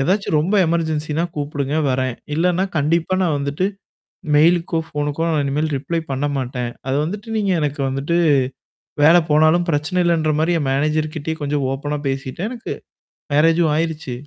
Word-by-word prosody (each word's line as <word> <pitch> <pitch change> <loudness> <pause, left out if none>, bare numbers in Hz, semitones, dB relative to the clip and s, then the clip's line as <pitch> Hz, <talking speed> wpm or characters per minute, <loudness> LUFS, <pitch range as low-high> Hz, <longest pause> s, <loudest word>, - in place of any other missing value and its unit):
ஏதாச்சும் 185 +3 +1
ரொம்ப 190 +7 0
எமர்ஜென்சின்னா 160 -1 -1
கூப்படுங்க 145 0 -2
வரேன், 130 -1 0 0.2
இல்லன்னா 180 +3 +2
கண்டிப்பா 165 +5 +1
நான் 160 -5 +1
வந்துட்டு. 140 +6 -1 0.7
மெயிலுக்கோ, 165 +2 +3
ஃபோனுக்கோ 145 +1 -3
நான் 155 -3 +1
இனிமேல் 150 +3 0
ரிப்ளை 160 +5 -2
பண்ண 135 +2 -1
மாட்டேன். 125 -2 -3 0.2
அத 135 - 0
வந்துட்டு 205 +6 -5
நீங்க 205 -2 0
எனக்கு 145 -1 -2
வந்துட்டு 135 +5 -1 0.9
வேல 165 +3 +7
போனாலும் 155 +3 +4
பிரச்சனை 155 +4 -1
இல்லன்ற 160 -3 +2
மாரி 160 +2 +2
என் 145 - -1
மேனேஜர் 155 +2 0
கிட்டயே 160 +1 -3
கொஞ்சம் 145 -1 -1
ஓப்பனா 145 +2 -3
பேசிட்டேன் 135 +8 -3
எனக்கு. 245 -2 -5 0.6
மேரேஜூம் 165 +1 +4
ஆயிருச்சு, 160 -4 -2
155 Hz, 145 wpm, -20 LUFS, 145-170 Hz, 0.9 s, வேல